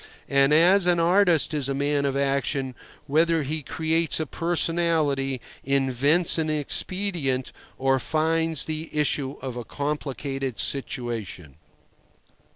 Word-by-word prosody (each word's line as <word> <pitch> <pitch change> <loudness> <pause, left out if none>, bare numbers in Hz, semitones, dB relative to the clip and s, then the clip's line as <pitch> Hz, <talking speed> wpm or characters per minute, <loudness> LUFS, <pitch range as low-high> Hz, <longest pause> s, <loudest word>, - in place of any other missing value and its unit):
And 140 +1 +3
an 175 +2 +5
artist 170 -4 +3
is 140 -3 -1
a 135 - -1
man 140 0 0
of 135 0 -1
action, 140 -1 -1 0.3
whether 160 +2 +2
he 155 +3 -3
creates 160 +3 0
a 155 - -1
personality, 160 -5 0 0.2
invents 140 +5 +2
an 160 -1 0
expedient, 155 -2 -1 0.3
or 135 0 +2
finds 160 +2 0
the 155 0 -4
issue 145 -2 0
of 130 -2 -4
a 120 - -4
complicated 135 -2 -4
situation. 115 - -4
145 Hz, 115 wpm, -25 LUFS, 135-165 Hz, 0.3 s, an